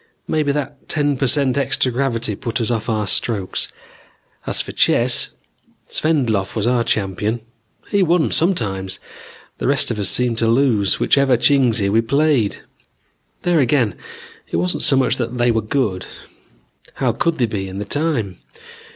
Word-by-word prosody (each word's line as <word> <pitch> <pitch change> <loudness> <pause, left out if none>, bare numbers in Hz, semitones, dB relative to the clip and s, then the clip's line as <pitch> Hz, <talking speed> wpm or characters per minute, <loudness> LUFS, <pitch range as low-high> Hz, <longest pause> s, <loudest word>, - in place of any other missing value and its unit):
Maybe 150 -2 +1
that 140 -1 -5
ten 145 -2 +1
per 135 +1 0
cent 140 0 +2
extra 135 -1 +1
gravity 120 -4 -1
put 115 +3 -3
us 115 0 -1
off 115 0 -2
our 110 -2 0
strokes. 100 0 0 0.8
As - - -1
for - - -3
chess, - - +2 0.6
Svendlov 120 -11 0
was 110 -1 0
our 120 -1 +2
champion. 105 0 -1 0.5
He 200 - +1
won 175 -3 +2
sometimes. 95 - -1 0.6
The - - -1
rest 140 -2 +2
of 110 - -3
us 100 - +2
seemed 120 -2 +1
to 115 - +1
lose 115 -5 +2
whichever 135 -3 +3
Chingsi 120 -6 +3
we 110 +3 +3
played. 140 -3 +1 0.8
There 175 -2 +2
again 125 -6 +2 0.6
it - - -4
wasn't 90 +1 +1
so 135 - +4
much 130 -2 +2
that 120 0 -3
they 120 0 +3
were 115 -1 +1
good. 105 -5 -2 0.9
How 130 -3 +1
could 165 +8 -1
they 125 - +2
be, 100 -4 -4
in 95 0 -7
the 105 - -4
time? 120 - -2
120 Hz, 160 wpm, -19 LUFS, 105-140 Hz, 0.9 s, so